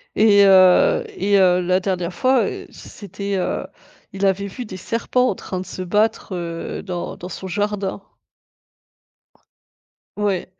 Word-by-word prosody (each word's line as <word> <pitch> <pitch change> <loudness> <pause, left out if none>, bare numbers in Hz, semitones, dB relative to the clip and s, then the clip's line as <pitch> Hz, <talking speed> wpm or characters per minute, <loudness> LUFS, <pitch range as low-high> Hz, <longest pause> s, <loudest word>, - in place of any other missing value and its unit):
et 205 -2 +6
heu, 190 - +5
et 205 - +1
heu, 180 -1 +4
la 180 +1 +1
dernière 180 -2 -2
fois, 255 +2 +2
heu, - - -6
c'était, 200 0 -7
heu 185 - -2 0.5
il 195 +1 -1
avait 195 +1 +1
vu 245 +6 -7
des 185 -4 -8
serpents 240 +5 0
en - - -2
train 185 - -6
de 185 - -6
se 185 - -7
battre, 210 +2 0
heu, 170 -1 -5
dans 180 -3 -5
dans 180 - -8
son 190 - -7
jardin. 205 0 -2 2.2
Oui. 205 -3 -1
195 Hz, 145 wpm, -21 LUFS, 185-210 Hz, 2.2 s, et